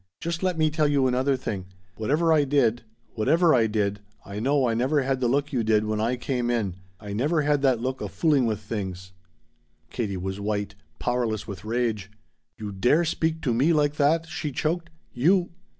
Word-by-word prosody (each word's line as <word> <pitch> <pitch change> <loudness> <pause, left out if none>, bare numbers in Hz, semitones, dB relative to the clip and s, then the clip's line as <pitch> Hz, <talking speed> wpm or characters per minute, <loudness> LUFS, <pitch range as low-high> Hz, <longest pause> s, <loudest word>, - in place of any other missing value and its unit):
Just 170 0 -3
let 185 -3 0
me 155 -1 +2
tell 150 0 +2
you 140 -2 +2
another 130 +2 +1
thing! 100 -7 -5 0.3
Whatever 155 +9 +2
I 150 -2 +4
did 130 -5 +2 0.3
whatever 160 +9 +3
I 115 -3 +4
did 105 -1 -1 0.3
I 100 +1 -6
know 135 +2 +2
I 115 - +1
never 130 +5 +1
had 135 0 0
the 125 - +1
look 140 +4 0
you 120 -3 +1
did 110 -1 +2
when 105 0 -1
I 120 +3 +1
came 125 -1 -2
in! 105 -7 -1 0.2
I 105 -2 -7
never 150 +8 +1
had 145 -1 +2
that 130 -4 +3
look 130 +2 -3
of - - -4
fooling 145 -7 +2
with 110 -2 -1
things!" 95 -3 -5 0.8
Katie 105 -6 -2
was 95 +2 -4
white 100 -1 -2 0.2
powerless 120 -4 -1
with 95 -3 -7
rage. 110 -3 -1 0.5
"You 105 -2 -6
dare 125 - +2
speak 160 0 -1
to 125 - +1
me 140 +9 +3
like 150 -1 +1
that!" 160 +3 +3
she 155 -2 -4
choked. 170 +5 -2 0.2
"You 175 +8 +2
125 Hz, 195 wpm, -25 LUFS, 110-150 Hz, 0.8 s, I